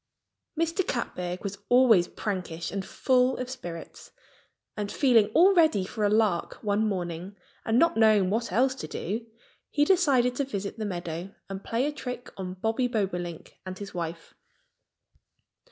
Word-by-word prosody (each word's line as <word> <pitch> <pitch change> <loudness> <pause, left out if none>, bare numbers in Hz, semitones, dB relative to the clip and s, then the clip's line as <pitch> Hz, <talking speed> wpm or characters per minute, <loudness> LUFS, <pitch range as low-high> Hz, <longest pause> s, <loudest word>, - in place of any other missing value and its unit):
Mr. 335 +3 0
Catbird 180 -7 -3
was 200 -1 -5
always 240 -8 +6
prankish 180 -6 -4
and 195 -1 -3
full 255 +5 +2
of 255 0 -4
spirits. 175 -10 -8 0.7
And 205 -1 -3
feeling 240 -7 +4
all 375 +4 +7
ready 315 - +4
for 215 +2 -4
a 205 - +4
lark 210 -5 +1
one 210 +1 +1
morning 180 -1 -4 0.3
and 225 +1 +2
not 335 +2 +4
knowing 215 -4 +4
what 230 +3 -1
else 260 +3 +3
to 265 - -7
do, 225 +6 -4 0.4
he 290 0 +2
decided 280 -9 +3
to 280 - +1
visit 205 -4 -5
the 215 - -2
meadow 175 -1 -5
and 195 0 -6
play 235 +4 0
a 295 - 0
trick 250 -4 -7
on 185 -1 -5
Bobby 225 +6 0
Bobolink 180 -7 -3
and 185 0 -7
his 200 0 -8
wife. 165 -1 -5
215 Hz, 155 wpm, -27 LUFS, 185-250 Hz, 0.7 s, all